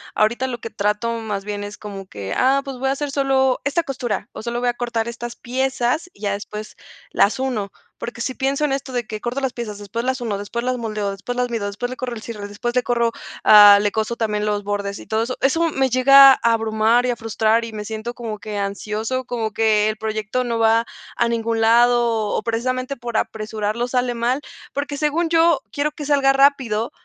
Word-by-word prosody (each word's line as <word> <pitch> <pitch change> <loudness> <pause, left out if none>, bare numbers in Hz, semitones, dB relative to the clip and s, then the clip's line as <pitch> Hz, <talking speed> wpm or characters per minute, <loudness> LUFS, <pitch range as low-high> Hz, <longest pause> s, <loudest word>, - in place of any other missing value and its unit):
ahorita 235 +5 +1
lo 245 -2 -4
que 230 - -7
trato 210 +3 -1
más 205 -3 -4
bien 205 -1 -4
es 205 0 -7
como 200 -3 -8
que, 100 - -6
ah, 270 +2 +3
pues 270 -2 -6
voy 265 +1 0
a 270 - +2
hacer 290 0 -4
solo 270 -2 +2
esta 315 +4 +1
costura 255 -5 -3
o - - -8
solo 235 +1 -3
voy 245 - +1
a - - 0
cortar 235 -2 -2
estas 235 0 -6
piezas 260 +5 -1
y - - -22
ya 200 -1 0
después 210 +1 -7 0.3
las 205 - +3
uno, 225 -7 -2 0.3
porque 240 0 -6
si 260 - -2
pienso 275 +3 0
en 275 - 0
esto 270 -1 -4
de 245 -2 -2
que 215 -1 -6
corto 245 +3 -2
las 265 -2 -2
piezas 215 -4 -5
después 210 +3 -5
las 260 0 -1
uno, 225 -5 -2
después 235 +4 -4
las 255 - 0
moldeo, 215 -3 -3
después 195 +5 -5
las 250 0 0
mido, 225 -4 -2
después 210 +5 -4
le 255 - -5
corro 255 -1 -4
el 220 - -8
cierre, 215 -3 -7
después 240 +4 -4
le 250 - +3
corro, 235 -1 +1 0.3
ah, 205 -1 +9
le 205 - +1
coso 220 +2 -1
también 210 -2 -1
los 205 -1 -1
bordes 200 -1 -3
y - - -11
todo 220 +1 0
eso, 255 +2 -4
eso 325 +5 +2
me 270 -3 +1
llega 270 +2 +8
a - - -1
abrumar, 225 +1 +2
y 250 - +1
a 240 - -2
frustrar 225 0 +1
y 230 - -6
me 210 -1 -6
siento 220 +2 -5
como 225 -4 -6
que 210 0 -6
ansioso, 210 +5 -3
como 230 -3 -3
que 215 -1 +3
el 215 - -2
proyecto 215 +3 -2
no 235 -1 -2
va 225 +1 +4 0.3
a 235 - +1
ningún 230 -1 -1
lado 240 +2 +5
o 225 -2 0
o - - 0
precisamente 255 +4 -2
por 240 -2 -6
apresurarlo 215 +2 -2
sale 245 -1 0
mal, 245 +4 0 0.3
porque 285 0 -3
según 310 +3 0
yo 330 -1 +4
quiero 290 +1 -1
que 300 - -8
salga 275 -2 +3
rápido, 265 -5 +2
235 Hz, 225 wpm, -21 LUFS, 215-255 Hz, 0.3 s, ah